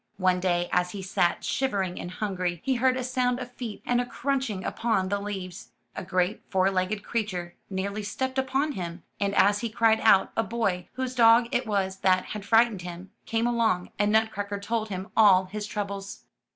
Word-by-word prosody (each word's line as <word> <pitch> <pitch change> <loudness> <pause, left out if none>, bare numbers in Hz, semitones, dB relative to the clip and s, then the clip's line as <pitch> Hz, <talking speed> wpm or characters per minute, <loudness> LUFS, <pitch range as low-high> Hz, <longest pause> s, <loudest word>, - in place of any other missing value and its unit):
One 185 -1 +2
day, 175 -1 +1
as 180 0 +1
he 195 -2 -6
sat 175 -2 0
shivering 195 -9 -1
and - - -6
hungry, 180 -3 -2
he 270 - +2
heard 255 +1 +2
a 255 - -2
sound 250 0 0
of 250 -1 -7
feet 240 -4 -7
and 245 0 +2
a - - -3
crunch 270 -1 -1
ing 190 -3 -4
upon 210 -4 0
the 200 +1 0
leaves. 190 -3 -6 0.2
A - - -5
great 185 +2 0
four 190 0 +2
legged 195 +2 -1
creature 185 -7 -3 0.2
nearly 200 +2 -3
stepped 260 +5 -2
upon 270 +3 0
him, 175 -7 -6 0.2
and 200 0 0
as 205 +1 +4
he 235 - -3
cried 225 -1 +3
out, 195 -3 +5
a - - +2
boy, 200 -5 -1
whose 260 -1 -3
dog 235 -1 +5
it 245 -1 0
was 190 -2 -1
that 185 -1 +2
had 210 -1 -6
frightened 225 -2 +3
him, 180 +2 -8 0.2
came 225 +1 0
along, 225 -7 +1
and 205 0 +3
Nutcracker 205 -2 0
told 220 +2 -2
him 190 +1 -5
all 195 -4 +6
his 210 +2 -5
troubles. 200 -1 -5
205 Hz, 195 wpm, -27 LUFS, 185-230 Hz, 0.2 s, all